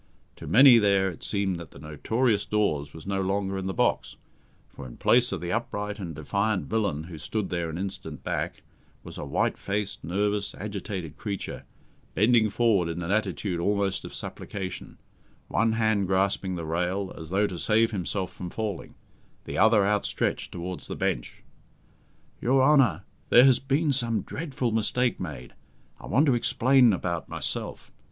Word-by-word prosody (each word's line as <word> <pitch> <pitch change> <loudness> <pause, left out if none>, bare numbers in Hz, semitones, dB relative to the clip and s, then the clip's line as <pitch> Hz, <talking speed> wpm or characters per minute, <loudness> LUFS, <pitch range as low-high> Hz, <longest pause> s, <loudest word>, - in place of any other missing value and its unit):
To - - -9
many 125 0 +8
there 100 -2 +3
it 80 - -13
seemed 100 -3 0
that 85 -4 -9
the - - -15
"notorious 100 - 0
Dawes" 75 -9 0
was 80 +1 -11
no 95 0 -1
longer 95 0 -1
in 95 - -4
the - - -1
box, - - 0 0.5
for, 70 - -10
in - - -12
place 125 0 +4
of - - -3
the 85 0 -3
upright 105 -2 -3
and 85 -5 -6
defiant 100 +6 -1
villain 100 -9 -1
who 80 -1 -9
stood 95 +5 -3
there 85 -2 -1
an 80 - -5
instant 95 +1 -6
back, - - -3 0.4
was - - -9
a - - -5
white - - 0
faced, 100 0 -3
nervous, 100 +3 -1
agitated 95 -6 -5
creature, 100 -1 -5 0.5
bending 110 +1 +4
forward 100 -6 +2
in 85 +1 -4
an 85 - -3
attitude 100 -3 -1
almost 100 +1 0
of - - -8
supplication, 95 -3 -7 0.5
one 115 -1 +2
hand 110 -3 +1
grasping 95 0 0
the 85 -2 -5
rail, 90 +4 -2
as 80 -1 -9
though 100 +3 +2
to 95 -4 -4
save 110 +1 +3
himself 95 -1 -3
from 90 - -7
falling, 105 -1 -5 0.5
the - - -4
other 110 -3 +5
outstretched 105 0 -1
towards 90 +1 -6
the - - -5
bench. - - -3 1.0
"Your 130 +2 +3
Honour, 130 - +4 0.3
there 120 - +8
has 130 -2 +5
been 140 +3 +1
some 115 -6 +1
dreadful 135 -7 -3
mistake 115 +3 +1
made. 70 -8 -7 0.5
I - - -10
want 140 +5 +3
to 135 - +4
explain 125 +1 +4
about 85 -5 -3
myself. - - -3
100 Hz, 165 wpm, -27 LUFS, 90-110 Hz, 1.0 s, many